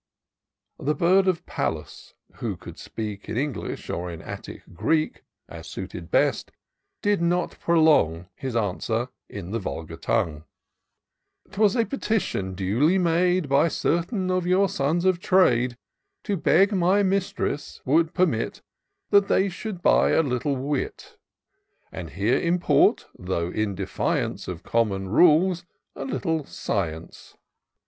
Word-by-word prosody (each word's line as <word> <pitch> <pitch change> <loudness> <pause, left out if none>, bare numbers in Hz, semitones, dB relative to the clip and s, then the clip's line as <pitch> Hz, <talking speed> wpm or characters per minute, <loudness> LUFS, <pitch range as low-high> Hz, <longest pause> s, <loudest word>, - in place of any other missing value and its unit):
" - - -56
The 150 - +2
bird 190 +2 +3
of 180 -3 0
Pallas, - - -4 0.2
who - - -3
could - - -11
speak 105 -3 -6
In 110 - -3
English 140 -1 -3
or 90 +1 -3
in 85 -2 -7
Attic - - -8
Greek, 155 - 0 0.3
As - - -10
suited - - -7
best, - - +1 0.5
did 205 -3 +2
not 175 +1 0
prolong 150 - +3
His 130 -3 -5
answer 110 +3 -1 0.2
in 95 -3 -7
the 115 - -1
vulgar 80 -4 -6
tongue: 85 -6 -1 0.3
— - - -56
" - - -59
* - - -35
'Twas 210 -1 +3
a 230 -2 +2
petition, 205 - -2
duly 115 - +2
made 180 -1 +2
By 140 +4 +4
certain 185 +4 -1
of 185 -1 0
your 190 +2 +4
sons 165 +2 0
of 185 -2 +3
trade, 125 - +3 0.5
To 205 - -1
beg 195 +3 +4
my 190 +2 +3
mistress 195 -4 -1
would 160 +5 +2
permit 160 -12 0 0.5
That 200 -1 +5
they 195 +1 +2
should 185 0 -6
buy - - +4
a 160 - +4
little 135 +1 -1
wit; 145 - -4 0.8
And - - -7
here - - +1
import, 175 +1 +3
though 90 -2 -2
in 105 -1 -1
defiance 95 0 -2
Of 90 -3 -6
common 100 -5 0
rules, 170 - +4 0.3
a 135 - -5
little 145 +4 -1
science. 85 - -5
155 Hz, 140 wpm, -25 LUFS, -, 0.8 s, That